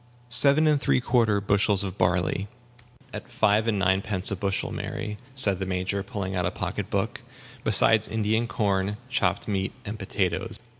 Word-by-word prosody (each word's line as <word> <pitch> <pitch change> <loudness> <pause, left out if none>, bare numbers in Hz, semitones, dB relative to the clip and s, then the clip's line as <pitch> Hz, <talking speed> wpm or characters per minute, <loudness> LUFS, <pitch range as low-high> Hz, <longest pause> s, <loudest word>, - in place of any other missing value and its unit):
"Seven 140 +5 +7
and 150 -2 +2
three - - +2
quarter 115 -4 +2
bushels 100 0 +1
of 95 -2 -5
barley, 90 +2 0 0.7
at - - -8
five 105 +2 +2
and 110 -3 +1
ninepence 95 0 0
a - - -1
bushel, 95 +1 -2
Mary," 105 -1 -5 0.2
said 100 -8 +1
the 95 - -2
Major, 95 +2 -2
pulling 100 -4 -5
out 90 - -1
a - - 0
pocket - - -5
book; - - -2 0.4
"besides 110 -1 +4
Indian 110 +1 0
corn, 100 -2 -1
chopped 135 +1 0
meat, 95 -2 -2
and 105 +1 -6
potatoes." 100 +2 -2
100 Hz, 160 wpm, -25 LUFS, 95-110 Hz, 0.7 s, Seven